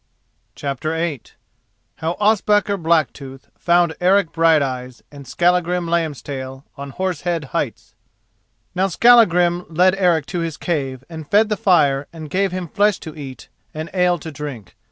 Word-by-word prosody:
CHAPTER 145 +2 -3
VIII 160 -6 -2 0.8
HOW 165 +2 -3
OSPAKAR 210 -1 +2
BLACKTOOTH 145 -5 -1
FOUND 175 -1 +2
ERIC 190 -1 +3
BRIGHTEYES 135 -7 +1
AND 140 -2 -12
SKALLAGRIM 175 +3 +1
LAMBSTAIL 140 -5 -3
ON 140 0 -7
HORSE 185 +2 -3
HEAD 170 -3 -2
HEIGHTS - - -3 0.8
Now 185 +2 +1
Skallagrim 180 -5 +4
led 180 +3 +3
Eric 175 -6 +2
to 180 - -4
his 165 -2 -3
cave 135 -6 -3
and 160 -3 -9
fed 215 +2 +4
the 210 - +1
fire 145 -8 +2
and 155 -3 -10
gave 195 0 +1
him 180 -1 -4
flesh 205 +4 +2
to 155 - -9
eat 135 -5 -9 0.3
and 155 +1 -6
ale 180 -1 +2
to 160 0 -8
drink. 145 -7 -8
165 Hz, 145 wpm, -20 LUFS, 145-180 Hz, 0.8 s, Skallagrim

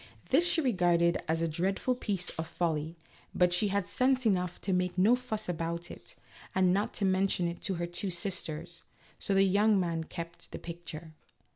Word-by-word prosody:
This 335 +7 +4
she 325 - +3
regarded 175 - +2
as 165 +1 0
a - - +2
dreadful 190 +10 0
piece 200 -7 -1
of 160 0 -5
folly, 160 -1 -2 0.4
but 180 -1 +3
she 190 +4 +3
had 200 -1 0
sense 260 +4 +2
enough 180 -4 +1
to 190 - -1
make 180 0 0
no 210 +7 +5
fuss 220 -4 -4
about 170 0 -3
it, - - -12 0.4
and 185 -1 +4
not 200 +2 -1
to 200 - +1
mention 190 -2 +2
it 170 0 -5
to 190 - 0
her 170 0 -2
two 175 +3 -1
sisters; 175 -2 -3 0.4
so 195 - 0
the 195 - +6
young 200 +2 +4
man 165 -3 -1
kept 170 0 -8
the - - -5
picture. 165 -2 -8
180 Hz, 185 wpm, -30 LUFS, 170-200 Hz, 0.4 s, the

